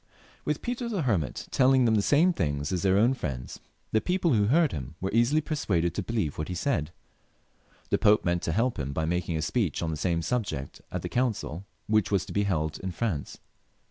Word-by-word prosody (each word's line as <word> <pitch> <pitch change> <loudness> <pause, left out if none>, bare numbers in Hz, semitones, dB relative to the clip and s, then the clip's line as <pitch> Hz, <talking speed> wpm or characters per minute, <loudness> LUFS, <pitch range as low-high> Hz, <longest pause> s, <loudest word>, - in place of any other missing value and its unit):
With - - -1
Peter 245 -1 -3
the 200 -8 -1
Hermit 90 - -1
telling 130 -1 +4
them 115 - +3
the 105 - +3
same 160 - +4
things 75 - -1
as 90 -2 -1
their 95 0 +3
own 115 +5 +4
friends, 65 - -5 0.3
the 110 - +2
people 180 -4 +1
who 105 -3 +3
heard 155 +7 +3
him 70 +1 -6
were 95 - -2
easily 120 +7 +3
persuaded 95 - 0
to - - -2
believe 100 -9 -2
what 80 - -2
he 90 - -4
said. 85 - 0 1.0
The - - +3
Pope 105 0 +4
meant 85 0 +1
to 80 - -1
help 115 +5 0
him 70 -1 -3
by 80 +2 -1
making 85 0 -1
a 80 - -2
speech 95 - 0
on 80 - -1
the 80 - -3
same 85 +1 0
subject 100 - -3
at - - -4
the - - -2
council 110 -8 -2 0.2
which 110 -5 +2
was 100 -3 +1
to - - -8
be 100 0 +1
held 80 -5 -1
in 95 - -4
France. 90 -6 -3
100 Hz, 215 wpm, -28 LUFS, 80-125 Hz, 1.0 s, telling